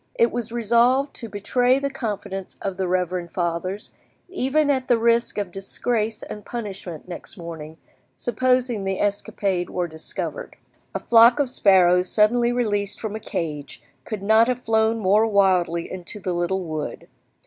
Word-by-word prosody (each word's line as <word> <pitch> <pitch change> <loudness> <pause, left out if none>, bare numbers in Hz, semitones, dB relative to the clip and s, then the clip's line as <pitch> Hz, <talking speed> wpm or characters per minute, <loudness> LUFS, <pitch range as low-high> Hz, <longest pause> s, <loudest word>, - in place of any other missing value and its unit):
It 470 -1 +3
was 235 -2 -4
resolved 240 +4 +2
to 230 - -7
betray 245 +5 +2
the 280 0 -2
confidence 205 -6 -5
of 195 -2 -4
the 190 -1 -1
reverend 180 -1 -1
fathers, 175 +3 -3 0.4
even 300 -3 +1
at 260 -2 -1
the 240 - +4
risk 235 0 +2
of 200 -3 -2
disgrace 215 +3 -2
and 210 - -8
punishment 195 -9 -7
next 175 -2 -8
morning, 160 -2 -8 0.4
supposing 245 -2 0
the 195 0 -2
escapade 200 -2 -1
were 180 -1 -2
discovered. 160 - -5 0.4
A - - 0
flock 235 +3 +6
of 275 -3 0
sparrows 180 -5 +4
suddenly 235 +3 +3
released 205 -5 -1
from 215 -2 -4
a - - -4
cage 150 - -5 0.2
could 210 -3 -6
not 220 +3 +5
have 250 -1 -2
flown 220 0 +2
more 210 +2 +3
wildly 185 -5 +2
into 185 +3 -8
the 185 -2 -2
little 175 +2 -1
wood. 155 -3 -5
205 Hz, 155 wpm, -23 LUFS, 180-240 Hz, 0.4 s, flock